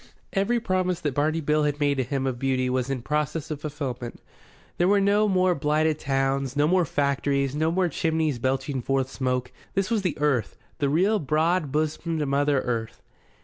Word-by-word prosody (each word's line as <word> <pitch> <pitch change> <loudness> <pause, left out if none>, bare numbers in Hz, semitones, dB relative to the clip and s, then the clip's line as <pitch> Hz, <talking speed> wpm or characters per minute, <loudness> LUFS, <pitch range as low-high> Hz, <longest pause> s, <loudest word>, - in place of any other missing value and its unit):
Every 215 +5 +1
promise 185 -5 0
that 145 -3 -1
Barney 155 +4 +1
Bill 150 +1 +2
had 145 0 0
made 145 -1 +2
to 130 - +1
him 135 +1 -2
of 130 -2 -2
beauty 130 -1 0
was 130 0 -1
in 130 -3 -3
process 150 +2 -2
of 145 -2 -4
fulfilment. 140 -5 -5 0.6
There 175 - +4
were 200 +1 +4
no 205 +2 +3
more 185 -2 +3
blighted 155 0 +1
towns, 135 0 0
no 145 +1 +3
more 180 +1 +3
factories, 140 -1 0
no 155 +2 +1
more 185 +1 +2
chimneys 160 -5 0
belching 135 +1 -1
forth 135 +1 -1
smoke. 125 -2 -2 0.2
This 195 +2 0
was 225 -3 +2
the 180 -4 -2
Earth, 145 -6 0 0.2
the 140 - +1
real 190 +8 +2
broad 155 +1 +1
bosomed 155 +1 -1
Mother 140 0 +2
Earth. 115 -3 -4
150 Hz, 185 wpm, -25 LUFS, 135-165 Hz, 0.6 s, There